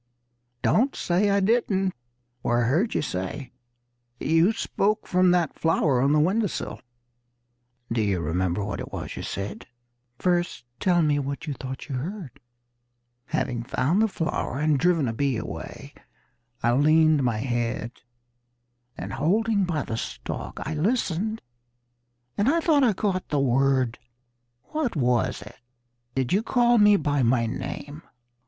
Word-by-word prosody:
Don't 260 +5 +3
say 185 +4 +1
I 200 0 +3
didn't, 195 -3 +1 0.5
for 120 0 +1
I - - +1
heard 175 - +1
you - - +1
say 120 +5 -4 0.7
You 165 +6 +3
spoke 215 -1 -1
from 185 0 +3
that 175 -3 +2
flower 155 -5 +2
on 140 +2 +3
the 150 - +4
window 200 +8 +2
sill - - -5 1.1
Do 115 -1 +1
you 100 -4 +1
remember 90 +4 -1
what 105 - -4
it - - -6
was - - -6
you - - -5
said?" 100 +1 -5 0.5
"First 175 -6 0
tell 175 -2 +3
me 145 -1 +2
what 140 0 -4
it - - -6
was - - -19
you - - -1
thought 130 -1 -7
you 135 -3 -3
heard." 150 - -6 0.9
"Having 125 -3 -2
found 145 - +1
the 220 - +4
flower 165 - -2
and 150 -1 +2
driven 165 -5 +2
a 115 - -1
bee 135 0 0
away, - - -7 0.7
I 120 - +3
leaned 155 +3 +4
my 120 -4 +1
head, 120 -1 -3 1.0
And - - -6
holding 200 +9 +1
by 160 -5 -1
the 115 - -4
stalk, - - -6
I 150 - -3
listened 210 +3 -1 1.0
and 205 +6 +3
I 335 - +2
thought 305 -3 +3
I 235 -4 +4
caught 190 -1 -2
the 145 - +1
word 130 -2 +2 0.6
What 300 - -2
was 125 -2 +1
it? - - -14 0.6
Did 130 +1 0
you 200 - +3
call 240 0 +3
me 210 0 +7
by 145 -4 0
my 120 -1 +3
name? 145 +6 -5
150 Hz, 155 wpm, -25 LUFS, 125-195 Hz, 1.1 s, me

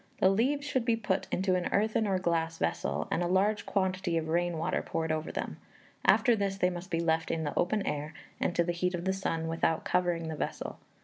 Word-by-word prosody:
The 190 - +5
leaves 275 +8 +1
should 260 -4 0
be 230 -1 +2
put 210 -4 -1
into 190 0 +1
an 180 -1 0
earthen 215 +1 +2
or 190 -1 +2
glass 165 -2 0
vessel, - - -1
and - - +1
a 175 - +1
large 195 +4 +2
quantity 185 -3 0
of 160 -1 -2
rain 175 0 +1
water 170 +3 0
poured 160 -1 -2
over 155 0 -2
them; - - -4 0.5
after 245 -3 +5
this 200 -2 -1
they 180 -2 +2
must 175 +1 -7
be 165 - 0
left 160 -1 +1
in 160 -1 -1
the 145 - -2
open 195 +3 +1
air, 150 +2 -3 0.2
and 175 - 0
to 170 - +4
the 175 - 0
heat 180 +1 0
of 175 +1 -5
the 190 - +2
sun, 165 -4 -2
without 165 0 0
covering 175 -2 +1
the 160 - -3
vessel. - - -4
180 Hz, 230 wpm, -30 LUFS, 165-195 Hz, 0.5 s, The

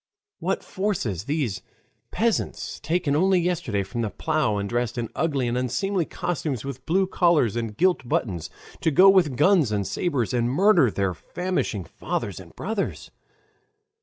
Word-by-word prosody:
What - - -1
forces 160 - -2
these 140 -8 -1 0.5
peasants, 230 0 -1
taken 165 -3 0
only 185 +3 +4
yesterday 170 - -1
from 95 +5 -4
the 110 - -1
plow 130 -3 0
and 100 0 -2
dressed 120 +2 -2
in 115 -1 -2
ugly 140 -6 0
and 120 - -1
unseemly 155 - 0
costumes 150 -9 -3
with 135 -2 -7
blue 190 +4 +3
collars 170 - +2
and 115 -3 -3
gilt 175 -9 +2
buttons, 85 -8 -1 0.3
to - - +2
go 185 +6 +7
with 170 -10 +3
guns 160 - +4
and 100 -2 0
sabers 135 - -1
and 120 -1 +1
murder 185 - +4
their 100 -2 -1
famishing 180 - -3
fathers 95 +3 -4
and 90 -3 -13
brothers? 205 0 -3
140 Hz, 155 wpm, -25 LUFS, 115-180 Hz, 0.5 s, go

